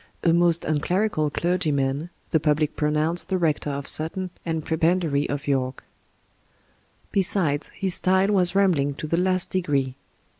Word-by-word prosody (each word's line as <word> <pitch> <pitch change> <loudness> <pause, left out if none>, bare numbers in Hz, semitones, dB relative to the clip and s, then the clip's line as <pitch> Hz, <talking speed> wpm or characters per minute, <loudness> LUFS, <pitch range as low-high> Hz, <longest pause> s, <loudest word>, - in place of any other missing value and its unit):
"A 170 - +3
most 170 -1 +2
un 155 -1 0
clerical 180 -2 0
clerg3rman," 150 -3 -1 0.2
the 160 - +3
public 150 0 0
pronoimced 155 +3 0
the 190 - 0
rector 155 -4 -1
of 140 -1 -5
Sutton 180 +4 +5
and 160 -2 -3
prebendary 160 -3 0
of 145 +1 -4
York. 130 -2 -2 1.3
Besides, 180 -7 0
his 190 -2 -2
style 190 +2 +1
was 185 -2 +1
rambling 160 -8 +2
to 155 - -6
the 165 +2 -1
last 185 0 0
degree. 140 -8 -1
160 Hz, 145 wpm, -23 LUFS, 145-180 Hz, 1.3 s, Sutton